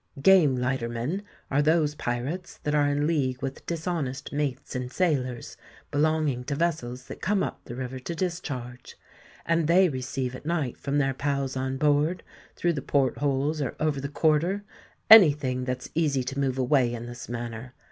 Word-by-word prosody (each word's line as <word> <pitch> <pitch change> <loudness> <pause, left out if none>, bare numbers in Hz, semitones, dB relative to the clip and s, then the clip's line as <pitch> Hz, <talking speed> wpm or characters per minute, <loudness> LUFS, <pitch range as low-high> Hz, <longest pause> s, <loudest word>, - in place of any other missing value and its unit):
Game 160 -4 +6
lightermen 125 +6 -2 0.3
are 140 +2 +3
those 155 0 +3
pirates 140 +7 -4
that 150 -2 -1
are 145 -1 +3
in 145 +1 +1
league 135 -6 0
with 135 0 -4
dishonest 160 -6 -3
mates 140 -3 -3
and 125 0 -3
sailors 130 -9 -1 0.3
belonging 150 -4 +1
to 140 - -2
vessels 140 -6 -2
that - - -9
come 200 0 +1
up - - -5
the 120 - -7
river 130 0 -5
to 165 +6 -5
discharge: 140 -9 -5 0.5
and 165 -2 +2
they 180 +2 +5
receive 130 -1 -3
at - - -10
night 155 -6 -1
from 140 +1 -2
their 135 -2 +2
pals 140 -1 -2
on 130 0 -2
board, 150 +5 +2 0.3
through 175 -1 +1
the 145 - -3
port 135 -2 +1
holes 145 +2 0
or 135 - -2
over 155 -3 0
the 140 - -4
quarter, 160 +7 +1 0.4
any 210 -8 +10
thing 130 -3 -3
that's 125 0 -4
easy 150 -5 +1
to 135 +2 -4
move 135 -2 0
away 130 -2 +3
in 120 0 -5
this 120 -1 -9
manner. 120 +1 -6
140 Hz, 175 wpm, -27 LUFS, 130-155 Hz, 0.5 s, any